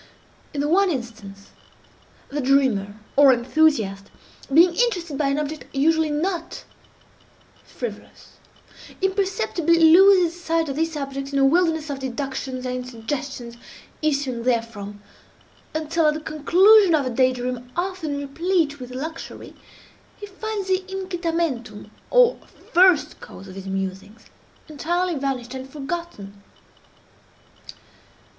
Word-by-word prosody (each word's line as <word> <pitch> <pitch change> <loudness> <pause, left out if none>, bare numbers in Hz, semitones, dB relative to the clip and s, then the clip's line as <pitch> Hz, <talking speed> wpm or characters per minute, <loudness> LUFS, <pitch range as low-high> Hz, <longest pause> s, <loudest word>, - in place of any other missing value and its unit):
In 285 - -3
the 290 - 0
one 385 +5 +3
instance, 220 - -7 0.8
the 290 +1 -3
dreamer, 255 -7 +2 0.2
or 280 -1 +7
enthusiast, 240 -6 +1 0.4
being 335 +5 +6
interested 355 -8 0
by 285 0 0
an 275 +1 0
object 300 -3 -4
usually 320 +3 +2
not 335 +3 -3 1.0
frivolous, 485 - -9 0.6
imperceptibly 375 - +1
loses 350 +1 +6
sight 330 -2 0
of 275 - -3
this 320 0 -1
object 275 -1 -5
in - - +1
a 270 - +4
wilderness 320 0 +2
of 275 - -5
deductions 260 0 -4
and 250 0 -4
suggestions 240 0 -6 0.4
issuing 280 -5 -1
therefrom, 225 -4 -2 0.7
until, 315 +1 +1
at 300 - +2
the - - -3
conclusion 350 +6 +5
of 290 -3 0
a 255 - -2
day 255 +2 +3
dream 250 0 -5
often 350 -5 -2
replete 290 +1 -1
with 250 -1 -8
luxury, 320 +5 -7 0.7
he 415 - -7
finds 410 0 -5
the 375 -1 +2
incitamentum, 330 - -3 0.2
or - - +4 0.3
first 345 -4 +4
cause 195 - -11
of 185 - -10
his 195 0 -9
musings, 195 +3 -5 0.4
entirely 345 +4 -1
vanished 265 -4 -3
and 260 0 -7
forgotten. 275 - -7
290 Hz, 120 wpm, -23 LUFS, 250-340 Hz, 1.0 s, or